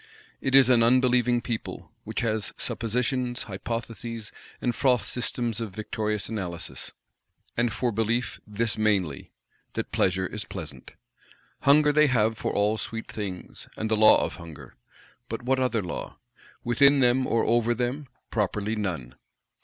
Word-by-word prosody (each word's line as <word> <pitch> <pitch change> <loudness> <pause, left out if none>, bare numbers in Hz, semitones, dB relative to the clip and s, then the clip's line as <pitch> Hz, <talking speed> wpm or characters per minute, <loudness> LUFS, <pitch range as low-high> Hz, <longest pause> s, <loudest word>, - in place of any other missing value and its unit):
It 135 -1 +1
is 135 -2 +8
an 125 -2 +5
unbelieving 125 0 +3
people; 115 -2 -5
which - - -2
has 110 -3 0
suppositions, 120 +2 -1
hypotheses, 115 +1 -5 0.3
and 120 - 0
froth 125 -1 +2
systems 120 -2 -2
of 105 -5 -5
victorious 105 -1 -2
Analysis; 95 -6 -4 0.6
and 120 0 +1
for 120 +3 -1
belief 115 +3 -1
this 110 +1 -1
mainly, 95 -10 0 0.4
that - - -4
Pleasure 95 0 +1
is 105 +3 -4
pleasant. 90 -6 -9 0.6
Hunger 150 +1 +5
they 150 0 +5
have 115 -4 +2
for 105 - -2
all 105 +2 +1
sweet 115 +2 -5
things; 100 -4 -6
and 110 0 -3
the - - +4
law 110 0 +7
of - - -6
Hunger; 85 -4 -11 0.5
but 115 +1 -4
what 130 +1 +1
other 125 -5 +1
law? 90 - -6 0.5
Within 140 +4 +5
them, 130 +1 +3
or 115 - +1
over 120 +1 +2
them, 125 +4 -2 0.2
properly 105 0 -1
none! 85 - -3
115 Hz, 145 wpm, -26 LUFS, 105-125 Hz, 0.6 s, is